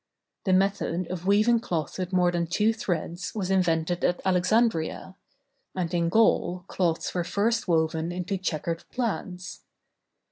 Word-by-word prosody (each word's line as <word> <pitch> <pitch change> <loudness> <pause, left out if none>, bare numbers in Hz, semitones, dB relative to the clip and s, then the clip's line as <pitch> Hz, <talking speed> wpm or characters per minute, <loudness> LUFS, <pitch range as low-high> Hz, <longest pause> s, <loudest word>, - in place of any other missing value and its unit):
The 190 - +3
method 185 -2 +1
of 185 0 -5
weaving 215 +4 +4
cloth 170 - -3
with 185 0 -3
more 180 -1 +3
than 170 -1 -1
two 210 +6 +2
threads 175 -4 -3
was 195 -3 -2
invented 175 -2 +1
at 175 - +2
Alexandria; 185 -1 +1 0.6
and 180 -2 -2
in 170 -1 +1
Gaul 180 -3 +2
cloths 170 -3 -1
were 175 - 0
first 225 +6 0
woven 160 0 +1
into 185 +2 -3
checkered 165 -2 -2
plaids. 190 -7 -4
180 Hz, 140 wpm, -26 LUFS, 170-200 Hz, 0.6 s, weaving